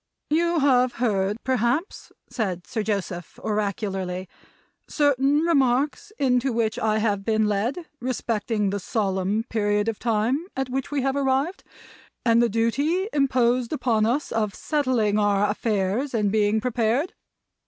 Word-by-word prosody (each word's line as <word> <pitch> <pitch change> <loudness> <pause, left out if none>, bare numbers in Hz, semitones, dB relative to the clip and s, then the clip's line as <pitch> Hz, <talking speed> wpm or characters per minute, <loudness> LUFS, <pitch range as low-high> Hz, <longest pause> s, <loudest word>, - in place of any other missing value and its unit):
"You 340 +2 +2
have 255 -3 +3
heard, 205 -4 0
perhaps," 260 - -1 0.2
said 200 -8 -3
Sir 220 - -3
Joseph, 195 -5 -3
oracularly, 195 -3 -2 0.6
"certain 285 0 +2
remarks 285 +3 +1
into 255 0 +2
which 225 -2 0
I 220 -1 +1
have 205 -2 0
been 220 0 +1
led 230 - -1
respecting 225 -4 -1
the 205 - -2
solemn 195 +1 -1
period 205 -2 0
of 225 -2 -2
time 240 +8 0
at 265 -1 -1
which 265 0 -2
we 285 -3 -1
have 270 0 0
arrived, 275 +6 0 0.6
and 230 0 +5
the 240 - +3
duty 285 - 0
imposed 250 -3 +2
upon 225 -7 +1
us 270 +6 -1
of 215 -3 -1
settling 250 -9 +1
our 205 0 +2
affairs, 215 +4 -1
and 210 -3 +1
being 215 0 +2
prepared. 245 +6 0
230 Hz, 135 wpm, -24 LUFS, 210-265 Hz, 0.6 s, and